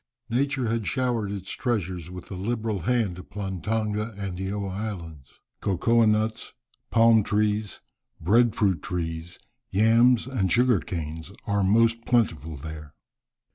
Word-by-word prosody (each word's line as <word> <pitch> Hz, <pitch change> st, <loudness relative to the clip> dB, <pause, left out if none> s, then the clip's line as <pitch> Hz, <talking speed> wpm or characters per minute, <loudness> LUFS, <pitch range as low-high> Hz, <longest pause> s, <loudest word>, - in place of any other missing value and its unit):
Nature 135 Hz, 0 st, +1 dB
had 115 Hz, -2 st, -1 dB
showered 120 Hz, -6 st, 0 dB
its 95 Hz, -2 st, -6 dB
treasures 95 Hz, -, -2 dB
with 90 Hz, +1 st, -10 dB
a -, -, -4 dB
liberal 110 Hz, +1 st, -2 dB
hand 100 Hz, -2 st, 0 dB
upon 95 Hz, -1 st, -6 dB
Tonga 105 Hz, +2 st, -1 dB
and 95 Hz, -3 st, -5 dB
Eoa 100 Hz, 0 st, -3 dB
Islands. 85 Hz, -9 st, -7 dB, 0.2 s
Cocoa 115 Hz, +5 st, +2 dB
nuts, 110 Hz, +1 st, 0 dB, 0.4 s
palm 115 Hz, -1 st, +5 dB
trees, 105 Hz, 0 st, 0 dB, 0.4 s
breadfruit 105 Hz, -2 st, +3 dB
trees, 85 Hz, -1 st, -4 dB, 0.3 s
yams, 115 Hz, +4 st, +4 dB
and 115 Hz, -9 st, -1 dB
sugar 120 Hz, -2 st, +4 dB
canes 80 Hz, +1 st, -5 dB
are 100 Hz, 0 st, +1 dB
most 115 Hz, +3 st, +3 dB
plentiful 85 Hz, -11 st, +1 dB
there. 75 Hz, 0 st, -9 dB
105 Hz, 125 wpm, -26 LUFS, 90-115 Hz, 0.4 s, palm